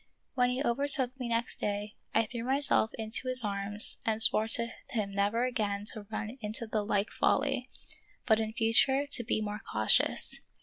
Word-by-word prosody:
When 250 -2 +1
he 250 +3 -2
overtook 265 0 +1
me 250 - -4
next 230 0 -2
day 205 +1 -3 0.2
I 225 - +1
threw 230 +1 -7
myself 265 -3 +1
into 225 +3 -3
his 255 -1 +2
arms 205 0 -1
and 220 -1 -1
swore 220 0 +6
to 235 +1 +1 0.2
him 210 -5 -3
never 205 +5 0
again 210 -5 -2
to 210 -3 -10
run 220 +3 -6
into 215 +2 -4
the 215 -1 -2
like 205 0 -1
folly, 270 -2 0 0.6
but 220 -2 +3
in 220 0 -3
future 245 +5 +2
to 280 -4 +6
be 215 - -1
more 210 0 -5
cautious. 110 0 +3
225 Hz, 175 wpm, -29 LUFS, 210-250 Hz, 0.6 s, swore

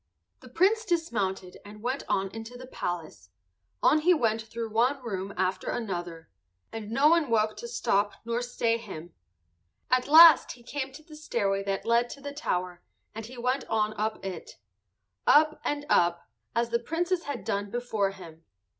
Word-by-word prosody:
The - - -14
Prince 420 +6 +2
dismounted 220 - -2
and 210 +1 -12
went 260 +3 -1
on 195 0 0
into 225 +3 -8
the 255 - -9
palace; 160 - -5 0.5
on 310 - +5
he 355 +3 +4
went 225 -6 +1
through 225 0 -6
one 245 +6 +2
room 195 -4 -4
after 185 0 -1
another, 175 -7 -4 0.4
and 220 -2 -6
no 270 +6 +3
one 330 -4 +3
woke 215 -1 +2
to 475 - -6
stop 205 - 0
nor 235 +1 -1
stay 235 -2 0
him. 175 -7 -9 0.8
At 255 0 +2
last 320 +2 +8
he 240 - -17
came 270 +1 -4
to 310 +3 -12
the 310 -1 -13
stairway 205 -10 -1
that 195 -1 -2
led 235 +1 +2
to 280 - -9
the 285 0 -7
tower 180 - -3 0.3
and 220 0 -7
he 250 +1 -11
went 255 +3 0
on 215 -1 0
up 215 -1 -3
it,—up 105 - -1
and 290 0 -2
up, 170 - +2 0.3
as 235 0 0
the 235 - +2
Princess 340 +7 -2
had 275 -8 -5
done 200 0 -2
before 220 -3 -1
him. 165 -4 -12
225 Hz, 170 wpm, -28 LUFS, 195-275 Hz, 0.8 s, last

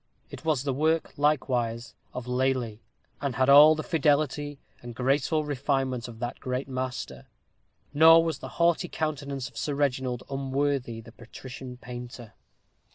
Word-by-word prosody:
It - - -9
was 155 -5 +1
the 140 -2 -1
work 160 +4 0
likewise 125 -6 0 0.2
of 125 -1 -6
Lely, 125 -3 -1 0.4
and 140 -4 -2
had 130 +2 +2
all 150 +3 +9
the 155 - -4
fidelity 145 -2 0 0.2
and 120 -1 -9
graceful 140 +4 +1
refinement 135 -3 -1
of 115 -2 -10
that 120 +1 -5
great 130 +1 -3
master; 130 - -5 0.7
nor 165 +2 +7
was 165 -4 -2
the - - -7
haughty 170 +1 +2
countenance 140 -5 -3
of - - -14
Sir 145 - -2
Reginald 130 -3 -1
unworthy 135 -3 -2
the 115 - -14
patrician 125 +2 -10
painter. 120 -2 -9
135 Hz, 145 wpm, -27 LUFS, 125-145 Hz, 0.7 s, all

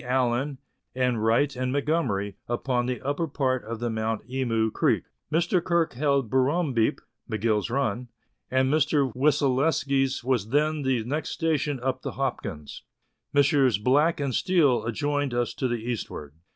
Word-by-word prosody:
Allan, 130 +2 0 0.4
and 125 -4 0
Wright 120 +5 +2
and 125 0 -2
Montgomerie, 130 -9 0
upon 120 0 -1
the 125 -1 -2
upper 145 +4 -1
part 130 -3 -1
of 115 +1 -6
the 120 0 -2
Mount 110 0 -2
Emu 115 -4 0
Creek. - - +1 0.3
Mr. 170 +2 +2
Kirk 170 -2 +1
held 140 -1 +1
Bur 130 +3 +2
rumbeep 140 -7 +1 0.3
(McGill's 110 -1 0
run), 125 -2 -1 0.4
and 130 +1 +2
Mr. 145 -4 +2
Wyselaskie's 135 -1 +1
was 120 -5 0
then 150 +3 +1
the 130 -4 0
next 145 +7 -3
station 150 -4 0
upon 130 -1 -1
the - - -4
Hopkins. 75 -2 -4 0.5
Messrs. 140 -4 +3
Black 145 +10 +2
and 140 -3 -1
Steele 145 -8 +2
adjoined 145 +2 -1
us 120 -1 0
to 130 - -1
the 120 - -1
eastward. 110 -11 -5
130 Hz, 150 wpm, -26 LUFS, 120-145 Hz, 0.5 s, Messrs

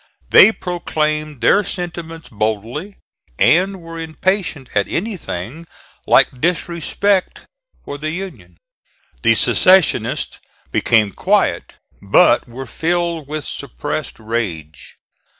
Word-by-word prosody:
They - - +9
proclaimed 155 - -3
their 200 - +4
sentiments 165 -5 -6
boldly, 115 - -3 0.4
and 190 +2 +3
were 165 0 -8
impatient 165 -3 -2
at 100 -1 +1
anything 165 - -5 0.4
like 125 - +3
disrespect 175 +3 0 0.4
for 145 - -6
the 155 +1 -3
Union. 185 +3 -7 0.6
The - - +4
secessionists 185 -2 +3 0.3
became 110 -3 +2
quiet - - 0 0.3
but - - +4
were 130 +3 -7
filled 170 +3 -2
with 155 0 -5
suppressed 145 +1 -5
rage. 95 -9 -5
155 Hz, 95 wpm, -18 LUFS, 125-175 Hz, 0.6 s, They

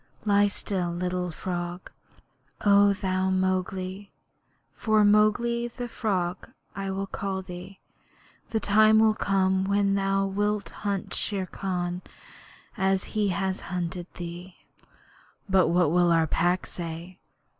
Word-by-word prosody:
Lie 205 0 +4
still, 190 -3 -2
little 180 +1 -2
frog. 175 +1 -5 0.7
O 200 0 +6
thou 190 -1 -1
Mowgli 185 +1 -1 0.6
for 215 -1 +3
Mowgli 225 +3 +3
the 245 +1 -6
Frog 190 -6 -2 0.3
I 195 0 -3
will 195 +1 -2
call 195 -1 -4
thee 180 +1 -9 0.7
the 225 -1 0
time 215 +1 +5
will 220 0 +5
come 190 -2 +1
when 200 0 +2
thou 195 0 +1
wilt 205 +1 -1
hunt 200 -2 -2
Shere 195 -3 -1
Khan 180 -2 -3 0.7
as 190 0 +1
he 210 -2 +1
has 190 0 -1
hunted 175 -1 -3
thee.' 175 +1 -8 0.9
'But 190 -2 +4
what 170 -2 +3
will 175 0 +4
our 165 -1 +4
Pack 175 +3 +1
say?' 170 +2 -7
190 Hz, 125 wpm, -27 LUFS, 180-205 Hz, 0.9 s, O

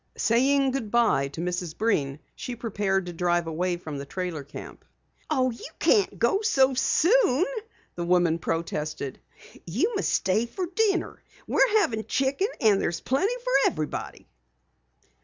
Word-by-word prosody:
Saying 270 +4 +3
good 255 -5 -3
bye 225 -12 +3
to 145 +4 -7
Mrs. 175 -2 -3
Breen, 145 -11 0 0.2
she 245 - -6
prepared 200 -5 -1
to 175 - -6
drive 175 0 +1
away 175 +2 -1
from 155 -5 -7
the 140 - -6
trailer 175 -3 -4
camp. 140 - -10 0.5
"Oh, 260 -4 +2
you 230 - -9
can't 415 -4 +2
go 395 - +2
so 270 -12 +3
soon," 345 - +3 0.5
the 175 - -4
woman 175 -1 +2
protested. 155 -4 -3 0.5
"You 260 - 0
must 400 - 0
stay 210 +5 +1
for 360 +10 -4
dinner. 390 +1 0 0.2
We're 435 - +3
having 220 - -1
chicken 275 +9 0
and 210 -3 +4
there's 170 -1 -1
plenty 385 - 0
for - - +3
everybody!" 155 -2 -5
215 Hz, 145 wpm, -26 LUFS, 170-275 Hz, 0.5 s, and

